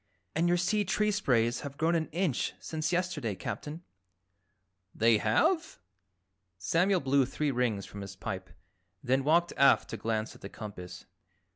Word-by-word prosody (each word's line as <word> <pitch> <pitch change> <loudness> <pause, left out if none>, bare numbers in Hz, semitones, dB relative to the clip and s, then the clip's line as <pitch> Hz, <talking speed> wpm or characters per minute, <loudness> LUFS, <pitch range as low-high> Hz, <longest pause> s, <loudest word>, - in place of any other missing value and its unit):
"And 170 +2 +2
your 175 0 +3
sea 205 +4 +1
tree 210 +2 +1
sprays 125 - +1
have 140 -1 -7
grown 165 +2 +2
an 160 -2 +1
inch 170 -7 -1
since 155 -1 -3
yesterday, 175 - -1
Captain." 150 - -6 1.1
"They 115 -1 +4
have?" 320 - +1 0.8
Samuel 175 - +2
blew 135 0 +3
three 145 +3 -1
rings 120 -6 0
from 100 - -9
his 100 -1 -8
pipe, 95 -1 -5 0.5
then 130 +2 +2
walked 170 +4 +3
aft 140 - +5
to - - -4
glance 110 -1 -2
at - - -17
the 100 - -7
compass. 90 -5 -9
140 Hz, 150 wpm, -30 LUFS, 110-175 Hz, 1.1 s, aft